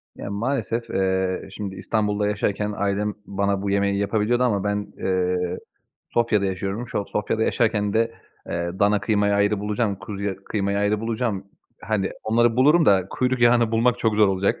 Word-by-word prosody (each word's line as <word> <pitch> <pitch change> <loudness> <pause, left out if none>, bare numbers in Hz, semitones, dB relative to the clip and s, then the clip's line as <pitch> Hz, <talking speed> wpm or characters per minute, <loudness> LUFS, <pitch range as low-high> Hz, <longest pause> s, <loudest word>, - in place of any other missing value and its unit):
Ya - - -7
maalesef, 115 +1 -2
eee, 95 -1 0
şimdi 100 -1 -6
İstanbul'da 105 0 0
yaşarken 105 0 -1
ailem 100 +1 0
bana 100 0 -1
bu 100 - -2
yemeği 100 0 +1
yapabiliyordu 110 +4 +1
ama 105 -6 +1
ben, 105 0 -2
eee, 90 -1 0 0.6
Sofya'da 115 -4 +2
yaşıyorum. 95 +5 -3
Şu - - -2
an - - -5
Sofya'da 105 +2 -1
yaşarken 105 -4 +1
de, 115 +1 +2 0.4
eee, 85 0 -2
dana 100 0 +3
kıymayı 100 -2 +1
ayrı 100 0 +2
bulacağım, 105 0 -1
kuzuya 100 -1 -4
kıymayı 100 -1 -1
ayrı 105 +1 +1
bulacağım. 115 -3 -2 0.4
Hani 100 -3 -1
onları 115 +1 +2
bulurum 150 +5 +5
da 95 -2 +4
kuyruk 130 0 0
yağını 120 -1 +4
bulmak 120 +2 +2
çok 110 -3 +1
zor 105 -1 +5
olacak. 95 0 0
105 Hz, 165 wpm, -23 LUFS, 100-115 Hz, 0.6 s, bulurum